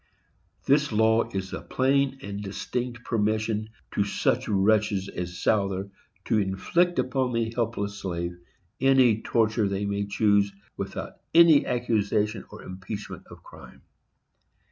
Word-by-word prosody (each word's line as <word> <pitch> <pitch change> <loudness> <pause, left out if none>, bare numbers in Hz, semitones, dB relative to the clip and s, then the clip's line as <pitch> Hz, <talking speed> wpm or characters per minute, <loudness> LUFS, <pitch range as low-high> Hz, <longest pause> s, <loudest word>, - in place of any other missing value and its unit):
This 145 +1 +3
law 110 +1 +3
is 95 -1 -4
a - - -4
plain 135 +1 +1
and 100 +1 -5
distinct 120 +4 -4
permission 110 0 -1 0.2
to 100 - +1
such 120 +5 0
wretches 100 -1 +2
as 90 0 -5
Souther 100 -2 0 0.3
to 110 - +2
inflict 170 - +1
upon 130 -1 0
the 115 -1 -1
helpless 105 -4 -2
slave 85 -2 -3 0.4
any 130 -5 +4
torture 110 -2 +1
they 100 +1 -2
may 100 0 -2
choose, 100 -1 +2 0.2
without - - -6 0.2
any 165 -3 +7
accusation 110 -3 0
or - - -11
impeachment 95 +3 -7
of - - -13
crime. - - -14
110 Hz, 125 wpm, -26 LUFS, 100-120 Hz, 0.4 s, any